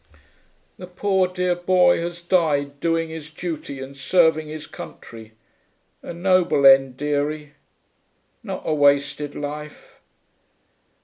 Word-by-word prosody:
The 180 - -8
poor 190 +1 0
dear 180 0 -1
boy 175 0 +3
has 170 0 -5
died 145 -6 0
doing 165 0 0
his 160 -2 -8
duty 155 -4 -6
and 135 +1 -8
serving 160 +2 +2
his 155 0 -7
country... 110 -6 -11 0.7
a - - -8
noble 175 -4 +2
end, 135 -1 +6
dearie... 150 +1 -2 0.9
not - - -6
a - - 0
wasted 145 0 +1
life....' 150 +1 -8
155 Hz, 115 wpm, -22 LUFS, 145-175 Hz, 0.9 s, end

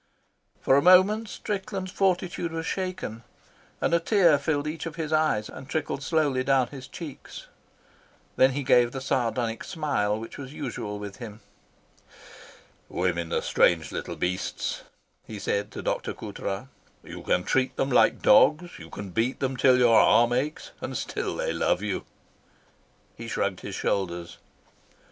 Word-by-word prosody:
For 135 - +4
a - - +4
moment 190 +5 +5
Strickland's 195 -2 -4
fortitude 180 -3 0
was 165 0 -4
shaken, 185 - -4 0.6
and - - 0
a 170 - +5
tear 170 -4 +4
filled 145 0 -1
each 155 +2 -4
of 160 - -7
his 160 -2 -3
eyes 155 -9 +2
and 130 - -11
trickled 155 -3 -2
slowly 145 -4 +1
down 130 -2 +2
his 135 -2 -9
cheeks. 155 -6 -9 0.9
Then 130 0 +4
he 140 +1 -2
gave 120 -1 +4
the 135 - -3
sardonic 120 -3 -1
smile 110 -10 -1
which 115 +4 -9
was 135 0 -8
usual 115 -8 -5
with 100 -1 -8
him. 110 -3 -9 1.5
"Women 85 -2 -1
are - - 0
strange 80 -2 +2
little - - -5
beasts," 90 +1 -2 0.5
he 110 - -7
said 100 0 -1
to - - -6
Dr. - - -2
Coutras. 100 +5 -5 0.4
"You - - -9
can 90 - +1
treat 130 +5 +1
them 135 - -1
like - - +4
dogs, 170 +4 +4
you 85 -1 -11
can 100 +1 -7
beat 115 +7 0
them 135 -1 -1
till 130 0 +5
your 120 -2 +6
arm 120 +1 +5
aches, 145 +5 -2
and - - -4
still - - -3
they - - -1
love 95 - +1
you." 105 -3 -3 1.1
He - - -8
shrugged - - -1
his - - -6
shoulders. 85 -3 -2
130 Hz, 155 wpm, -26 LUFS, 110-160 Hz, 1.5 s, your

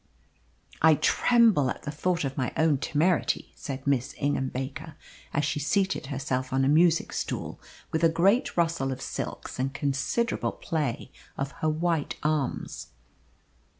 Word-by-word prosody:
"I 160 0 +7
tremble 210 - +4
at - - -5
the 145 - -4
thought 170 +3 0
of 135 -1 -3
my 125 - -1
own 155 -4 +3
temerity," 160 +4 +1
said 135 -1 -6
Miss 135 -3 0
Ingham 140 -2 0
Baker, 145 +5 -6 0.4
as 145 - 0
she 145 +1 -1
seated 190 +1 0
herself 130 -2 -2
on 135 0 +2
a - - +2
music 165 +3 +3
stool - - -4 0.3
with 160 +1 -1
a 165 - +7
great 190 +10 +2
rustle 165 -6 +1
of 130 - -4
silks 135 - -5
and 135 +1 0
considerable 145 - -1
play 145 -5 -3 0.3
of 135 0 -2
her 155 - +2
white 160 -1 0
arms. 150 -3 -2
150 Hz, 150 wpm, -27 LUFS, 135-165 Hz, 0.4 s, I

